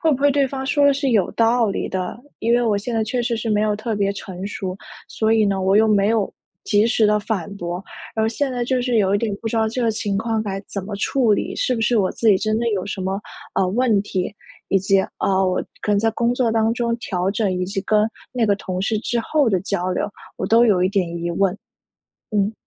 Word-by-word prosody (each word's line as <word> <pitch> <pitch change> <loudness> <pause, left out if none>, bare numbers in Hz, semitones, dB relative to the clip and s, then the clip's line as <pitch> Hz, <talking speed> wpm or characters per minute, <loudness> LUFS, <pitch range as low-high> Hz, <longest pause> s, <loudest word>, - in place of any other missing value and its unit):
会 325 - +3
不 - - +1
会 285 - +5
对 280 -1 +2
方 265 0 -4
说 285 +1 +3
得 285 - +6
是 275 -1 0
有 210 -6 +2
道 230 0 +3
理 - - -2
的， 185 +3 -3 0.2
因 230 +1 +2
为 245 - +3
我 220 -3 +2
现 235 +3 -4
在 220 -1 +1
确 240 +3 -1
实 235 -1 -1
是 225 0 -3
没 210 -1 +2
有 210 -1 +1
特 220 +1 -3
别 200 -1 +1
成 190 0 -6
熟， 190 -2 -4 0.3
所 220 0 0
以 220 - +4
呢， 195 -1 0
我 190 +1 +3
又 220 +1 +5
没 205 -1 +3
有 220 -3 +1 0.3
及 210 +1 +3
时 225 -2 +3
地 210 0 +3
反 205 -2 -3
驳。 175 +1 -4 0.3
而 220 0 +1
现 270 +4 -1
在 245 -1 -1
就 255 0 0
是 245 -2 0
有 195 -1 +2
一 - - +3
点 215 -3 -1
不 225 - -2
知 - - -4
道 220 -1 +2
这 245 +3 -2
个 230 - +2
情 210 -2 -2
况 225 -1 -1
该 195 -2 -3
怎 200 - -3
么 205 - -5
处 235 +2 +2
理， - - -3
是 255 - +1
不 225 - -3
是 225 +1 +3
我 190 -2 +2
自 230 - -3
己 200 -3 +5
真 215 +2 0
的 235 - -1
有 195 -2 -2
什 195 - -4
么， 190 +2 -2 0.3
呃， 190 - +2
问 225 0 +2
题？ 190 0 -3 0.4
以 195 - +4
及， 195 +1 +3 0.2
呃， 190 -1 +2
我 185 - -1 0.2
可 210 - +1
能 200 - +3
在 225 +1 +2
工 235 +2 +1
作 240 -3 +1
当 225 0 +2
中 235 -1 0
调 185 -4 -1
整， 210 -1 0
以 180 0 -1
及 195 +1 -3
跟 215 +1 +3 0.3
那 245 -2 +1
个 205 - +3
同 185 -2 -4
事 215 +2 0
之 240 +1 -1
后 290 +1 +1
的 190 - +2
交 185 -2 -1
流， 180 - -1 0.3
我 - - -3
都 230 +3 +5
有 190 -5 +3
一 - - +3
点 195 -4 +1
疑 170 0 -2
问。 195 +2 +1 0.8
嗯。 205 +1 +1
215 Hz, 280 characters per minute, -21 LUFS, 195-235 Hz, 0.8 s, 得